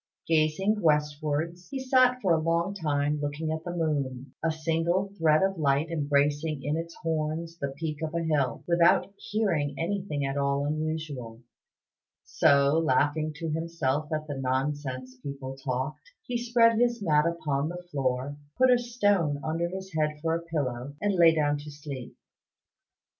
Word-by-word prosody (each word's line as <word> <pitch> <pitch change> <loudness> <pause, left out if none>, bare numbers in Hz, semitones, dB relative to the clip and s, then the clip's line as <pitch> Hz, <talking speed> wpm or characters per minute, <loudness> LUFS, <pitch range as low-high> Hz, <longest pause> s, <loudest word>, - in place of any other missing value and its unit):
Gazing 165 +7 +2
westwards, 150 +2 0
he 275 - -4
sat 255 -1 +3
for 180 -3 +4
a 160 - +2
long 170 +4 +1
time 150 -5 0
looking 145 +2 -2
at 160 0 -3
the 175 - -5
moon 140 -5 -2
a 165 - +2
single 165 +5 0
thread 155 +1 +4
of 195 -2 0
light 145 +2 +1
embracing 145 -1 +1
in 145 +2 0
its 165 +1 -5
horns 165 +1 -2
the 140 - -1
peak 155 -1 -4
of 160 +1 -3
a 170 - 0
hill 145 -7 0
without 170 +3 +4
hearing 170 -11 -1
anything 165 -4 -2
at 135 +1 -2
all 140 0 +1
unusual; 150 -6 -4 0.8
so, 140 0 +4
laughing 155 +1 +1
to 160 0 -4
himself 155 -3 -1
at 155 -1 -1
the 150 - -5
nonsense 130 -1 -2
people 135 -1 -6
talked, 135 +2 -4
he 245 - -5
spread 235 -1 +4
his 240 -1 +2
mat 150 -2 +3
upon 155 -3 -1
the 175 +1 -7
floor, 130 0 -1 0.2
put 255 0 +5
a 245 - +5
stone 205 -11 +1
under 165 +2 -1
his 190 0 -7
head 150 -1 0
for 165 0 +1
a 165 - -1
pillow, 140 -5 -3
and 205 -1 +1
lay 170 -3 +6
down 145 -1 +1
to 150 +1 -9
sleep. 145 -3 -8
155 Hz, 160 wpm, -28 LUFS, 145-170 Hz, 0.8 s, lay